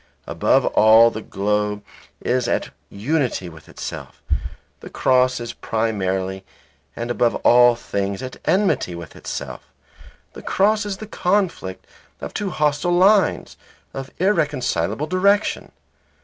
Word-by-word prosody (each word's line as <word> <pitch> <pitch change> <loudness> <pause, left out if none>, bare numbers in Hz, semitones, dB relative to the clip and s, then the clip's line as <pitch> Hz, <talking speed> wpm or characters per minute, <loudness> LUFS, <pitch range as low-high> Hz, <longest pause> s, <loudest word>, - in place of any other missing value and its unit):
Above - - +2
all 110 +2 +6
the 110 - -6
globe 105 0 -2 0.4
is 125 -1 0
at - - -1 0.2
unity 125 - -1
with 80 -2 -15
itself; - - -8 0.6
the - - -10
cross 130 -1 +2
is 120 0 -6
primarily 95 -4 -2 0.5
and 120 +1 -4
above 120 0 +1
all 120 0 +6
things 100 -1 -3
at 130 - -7
enmity 190 - +1
with 85 -3 -10
itself. 65 -3 -6 0.7
The - - -10
cross 210 +2 +1
is 195 -2 -4
the 215 - -8
conflict 180 - -1 0.3
of - - -7
two 205 - -2
hostile 150 +1 0
lines, 195 +2 +3 0.4
of 135 0 -6
irreconcilable 150 -6 0
direction. 200 +5 +1
125 Hz, 120 wpm, -21 LUFS, -, 0.7 s, all